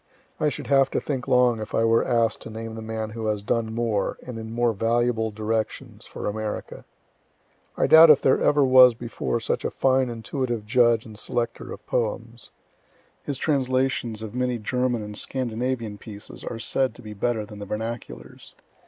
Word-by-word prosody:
I 150 - +2
should - - -6
have 135 -1 +4
to - - -1
think 135 -4 -4
long 125 -2 +3
if 110 0 -5
I 115 - +2
were 115 0 +4
ask'd 115 -2 +1
to - - -9
name 110 0 -6
the 110 - -7
man 110 -1 -4
who 110 0 -4
has 105 -1 -1
done 110 +1 -1
more, 110 -3 -1
and 125 -3 -6
in 110 0 -7
more 120 0 +1
valuable 115 +1 +1
directions, 110 +1 -4
for - - -7
America. 105 0 -4 0.9
I - - +3
doubt 160 +1 +9
if 150 - +8
there 130 - +3
ever 145 -1 +4
was 130 -2 +7
before 120 0 -3
such 115 - -2
a - - 0
fine 130 -1 +2
intuitive 120 -1 -3
judge 120 0 +3
and 110 - -11
selecter 120 +1 -3
of - - -9
poems. 115 +1 -3 0.7
His 140 -2 -4
translations 130 -6 0
of 110 - -7
many 125 -1 -1
German 125 +1 -1
and 105 0 -8
Scandinavian 120 -3 -3
pieces 105 -2 -10
are 115 - -5
said 130 +4 -1
to 125 - -14
be 105 -1 -8
better 110 +1 -1
than 105 0 -11
the 100 - -7
vernaculars. 105 - -7
115 Hz, 180 wpm, -24 LUFS, 110-125 Hz, 0.9 s, doubt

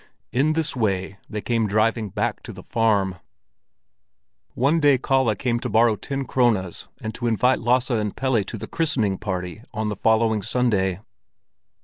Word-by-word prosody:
In 140 +6 +2
this 155 -2 -1
way 95 -4 -1
they 105 - -4
came 115 -1 0
driving 110 +1 +1
back - - -2
to - - -9
the - - -11
farm. 100 -5 +1 1.4
One 145 +6 +2
day 145 -3 +5
Kalle 130 -3 +1
came 120 -1 -1
to - - -4
borrow 115 0 +4
ten 135 +5 -4
krones 115 -9 0
and 110 - -5
to 120 +2 -3
invite 125 +3 +2
Lasse 125 +2 +2
and 105 -3 -1
Pelle 130 -6 +1
to 110 - -7
the - - -6
christening 125 - 0
party 95 -1 -4
on 110 0 -1
the 105 - -3
following 110 +1 +2
Sunday. 100 -5 0
115 Hz, 160 wpm, -23 LUFS, 105-125 Hz, 1.4 s, day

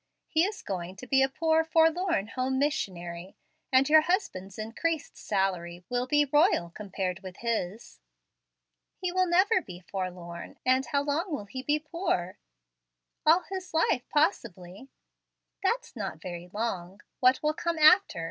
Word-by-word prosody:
He 320 +2 +3
is 415 +2 -5
going 185 -1 -5
to 225 - -10
be 270 +1 +3
a 270 - +3
poor, 320 +3 +2
forlorn 325 - +2
home 260 +2 -1
missionary; 185 - -3 0.3
and 260 +1 +5
your 310 +1 +7
husband's 310 - -2
increased 285 +9 -3
salary 180 -3 -2
will 245 0 -1
be 295 +2 +3
royal 295 - +3
compared 190 -2 -4
with 185 -1 -10
his." 225 -3 -3 1.0
"He 365 -1 -2
will 370 0 +2
never 375 +3 +4
be 180 - -10
forlorn; 180 -2 -6
and 260 0 +3
how 280 +2 +1
long 310 +6 -1
will 280 -9 -3
he 260 +6 -6
be 295 +3 +1
poor?" 305 - -3 0.9
"All 340 +3 +6
his 370 -3 -6
life 255 -6 +1
possibly." 210 - -1 0.7
"That's 470 - -1
not 195 -8 -5
very 175 0 -7
long. 195 -3 -4 0.2
What 255 -1 +4
will 305 0 +2
come 340 +1 -2
after? 310 - +6
260 Hz, 150 wpm, -28 LUFS, -, 1.0 s, your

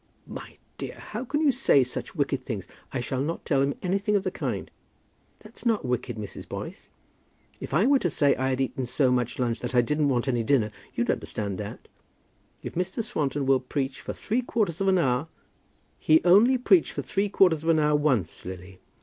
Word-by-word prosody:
"My - - -9 0.2
dear, - - -5
how 220 +4 -6
can 290 +4 -1
you 300 -3 +5
say 245 - +4
such 125 +8 -6
wicked 140 -3 -1
things! 105 -8 -5 0.2
I 130 - -2
shall 130 +2 -2
not 160 +4 -3
tell 140 -3 +2
him 140 +1 +1
anything 195 +3 +1
of 200 - +2
the - - -1
kind." - - -4 0.7
"That's - - -12
not 225 - +1
wicked, 125 -1 -2
Mrs. 105 -2 -8
Boyce. - - -7 0.7
If - - -7
I 165 +9 +3
were 275 +1 +5
to 175 - 0
say 145 -1 +3
I 130 +1 -1
had 130 0 -1
eaten 130 -1 -2
so 130 +1 +2
much 125 -1 0
lunch 120 -2 -1
that 125 +1 -4
I 120 - +6
didn't 150 +4 +1
want 125 0 0
any 120 -3 +1
dinner, 115 -3 +2 0.2
you'd - - +1
understand 100 -2 -4
that. 105 -1 -7 0.8
If - - -6
Mr. 185 +6 -2
Swanton 145 - -1
will 135 -1 +4
preach 135 +1 -3
for - - -5
three 235 +4 -1
quarters 205 -8 -1
of 195 - +1
an 190 -1 +4
hour 135 -2 +1 0.4
" - - -40 0.3
"He 155 0 +5
only 215 +9 +6
preached 195 -8 +3
for 140 - -3
three 200 +10 -1
quarters 180 -6 +4
of 165 - -2
an 165 - +5
hour 150 -1 +3
once, 130 - 0
Lily." 90 0 -9
140 Hz, 210 wpm, -26 LUFS, 125-185 Hz, 0.8 s, I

